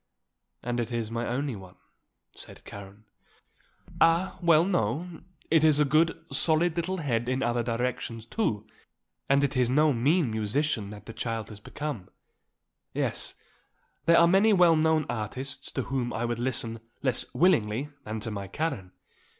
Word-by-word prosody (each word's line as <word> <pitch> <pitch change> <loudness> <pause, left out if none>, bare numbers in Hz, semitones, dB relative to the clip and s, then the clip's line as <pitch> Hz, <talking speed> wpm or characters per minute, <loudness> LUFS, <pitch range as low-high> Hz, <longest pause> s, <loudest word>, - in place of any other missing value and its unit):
"And 120 0 -2
it 120 0 -3
is 115 -2 -3
my 115 +1 -2
only 135 +1 -2
one," 95 -2 -12 0.6
said - - -12
Karen. 100 +2 -11 1.0
"Ah, 165 +3 +3
well, 165 -1 +5
no; 170 - -1 0.3
it 160 -1 +5
is 155 -2 +5
a 150 - +4
good, 160 +3 +2
solid 160 +1 +2
little 180 +2 -2
head 120 -7 -1
in 130 +1 0
other 120 0 +1
directions, 115 -1 -3
too. 110 - -1 0.6
And 140 +1 +4
it 140 -1 0
is 125 -2 +2
no 150 +3 +4
mean 140 +3 +2
musician 110 +1 -1
that 105 0 -10
the 115 - -8
child 115 -2 -4
has 105 -2 -9
become. 120 -4 -6 0.9
Yes; - - -2 0.7
there 170 0 +6
are 170 - +7
many 195 +5 +5
well 175 -3 +6
known 155 -1 +2
artists 125 +5 -4
to 130 - -1
whom 125 -2 -2
I 115 +2 -2
would 120 -1 -2
listen 115 -2 -2 0.2
less 130 -3 0
willingly 135 - +2
than 110 0 -5
to 115 - -4
my 100 -2 -5
Karen. 115 - -3
130 Hz, 160 wpm, -27 LUFS, 115-160 Hz, 1.0 s, are